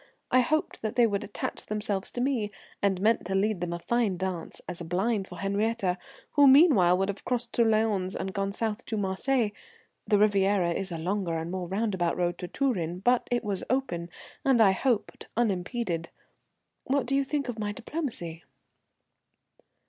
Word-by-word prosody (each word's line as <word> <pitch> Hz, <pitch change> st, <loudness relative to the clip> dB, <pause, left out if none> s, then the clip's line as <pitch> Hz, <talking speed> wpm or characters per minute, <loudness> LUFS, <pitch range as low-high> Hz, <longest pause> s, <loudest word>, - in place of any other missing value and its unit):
I 255 Hz, -, +6 dB
hoped 310 Hz, +5 st, 0 dB
they 235 Hz, +2 st, +3 dB
would 205 Hz, -3 st, 0 dB
attach 205 Hz, -, -5 dB
themselves 210 Hz, -2 st, -2 dB
to 245 Hz, -, -2 dB
me, 245 Hz, -6 st, 0 dB, 0.3 s
and 195 Hz, -2 st, +2 dB
meant 220 Hz, +4 st, +3 dB
to 190 Hz, +2 st, -2 dB
lead 200 Hz, -1 st, +1 dB
them 175 Hz, -1 st, -2 dB
a 170 Hz, -, -2 dB
fine 215 Hz, 0 st, 0 dB
dance 185 Hz, -2 st, -4 dB
as 180 Hz, -1 st, -6 dB
a -, -, -3 dB
blind 190 Hz, +4 st, 0 dB
for 180 Hz, -, -10 dB
Henriette, 200 Hz, 0 st, 0 dB, 0.4 s
who, 285 Hz, -1 st, +6 dB
meanwhile, 265 Hz, -, +6 dB
would 195 Hz, +1 st, +1 dB
have 200 Hz, -, -5 dB
crossed 245 Hz, -1 st, -2 dB
to 235 Hz, -, +4 dB
Lyons 215 Hz, -4 st, +1 dB
and 190 Hz, 0 st, -3 dB
gone 195 Hz, 0 st, -1 dB
south 215 Hz, 0 st, -2 dB
to 220 Hz, -, -2 dB
Marseilles. 210 Hz, +4 st, +1 dB, 0.6 s
The 210 Hz, -, +4 dB
Riviera 200 Hz, -3 st, +3 dB
is 190 Hz, +2 st, -3 dB
a 165 Hz, -, -3 dB
longer 175 Hz, 0 st, -1 dB
and 165 Hz, +1 st, -4 dB
more 185 Hz, -1 st, -3 dB
roundabout 190 Hz, -3 st, 0 dB
road 175 Hz, -1 st, 0 dB
to 180 Hz, -, -4 dB
Turin, 180 Hz, -, -1 dB
but 245 Hz, +3 st, +2 dB
it 245 Hz, 0 st, 0 dB
was 200 Hz, -3 st, -2 dB
open, 220 Hz, -10 st, -1 dB, 0.3 s
and 265 Hz, -3 st, +4 dB
I 205 Hz, -4 st, +7 dB
hoped 230 Hz, +3 st, -1 dB
unimpeded. 190 Hz, -5 st, -1 dB, 0.8 s
What 275 Hz, -1 st, +1 dB
do 275 Hz, -, 0 dB
you 275 Hz, -, +3 dB
think 280 Hz, 0 st, -2 dB
of 235 Hz, -3 st, -4 dB
my 205 Hz, -1 st, -1 dB
diplomacy?" 225 Hz, -, -5 dB
205 Hz, 180 wpm, -28 LUFS, 185-240 Hz, 0.8 s, I